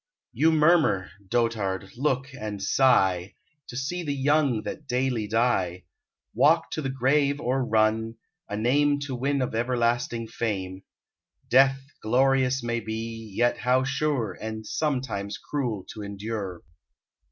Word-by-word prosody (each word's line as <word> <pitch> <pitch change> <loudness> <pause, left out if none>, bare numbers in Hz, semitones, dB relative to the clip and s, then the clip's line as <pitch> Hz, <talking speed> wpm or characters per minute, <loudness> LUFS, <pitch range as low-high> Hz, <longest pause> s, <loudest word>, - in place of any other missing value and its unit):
You 160 +1 +3
murmur, 150 - +3 0.2
dotard! 100 -5 -1
look 135 0 -1
and 105 -5 -5
sigh, 95 -5 +2 0.3
To 120 - -7
see 160 +7 -2
the 145 -4 -2
young, 140 -4 +2
that 150 -2 -7
daily 125 -4 0
die; 105 -6 +1 0.5
Walk 165 +2 +3
to 155 - -2
the 135 - -2
grave 140 +2 +2
or 130 -2 0
run, 110 0 +1 0.3
a 105 - -3
name 145 +6 +2
To 140 -2 -4
win 135 +2 0
of 125 - -3
everlasting 120 0 0
fame: 95 -5 -3 0.7
Death 135 +1 +5 0.2
glorious 130 +2 +2
may 120 0 -1
be, 115 0 -6
yet 120 0 +2
how 130 +1 +2
sure, 135 -6 -1
And 110 +1 -6
sometimes 125 -8 -2
cruel 120 -10 -3
to 110 - -8
endure. 100 -3 -5
120 Hz, 130 wpm, -26 LUFS, 110-135 Hz, 0.7 s, Death